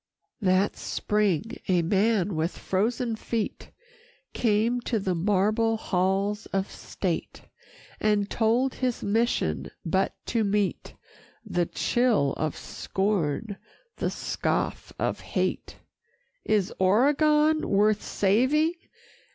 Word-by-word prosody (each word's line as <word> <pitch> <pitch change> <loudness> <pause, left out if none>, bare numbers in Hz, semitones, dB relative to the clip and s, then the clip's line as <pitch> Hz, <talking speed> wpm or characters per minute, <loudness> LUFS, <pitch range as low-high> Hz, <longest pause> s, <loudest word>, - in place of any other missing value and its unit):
VIII 195 - +2
That 190 +2 +2
spring, 210 - -1
a 180 -2 +3
man 200 +1 +2
with 160 +3 -1
frozen 225 +4 -1
feet 220 0 -4 0.6
Came 230 +2 +1
to 240 -1 -1
the 190 -3 -1
marble 210 +5 +1
halls 195 +2 0
of 195 0 -2
State, - - -4 0.6
And 210 -1 +2
told 240 +5 +1
his 250 -2 -2
mission 225 +4 0 0.2
but - - 0
to 230 -2 0
meet 200 -3 -1 0.5
The 175 -1 0
chill 235 - +1
of 155 -1 -2
scorn, 195 0 -2 0.4
the - - -1
scoff - - -2
of - - -1
hate. - - -2 0.7
"Is 210 -3 +1
Oregon 300 +10 +3
worth 210 +1 +3
saving?" 260 - +2
210 Hz, 105 wpm, -26 LUFS, 190-230 Hz, 0.7 s, a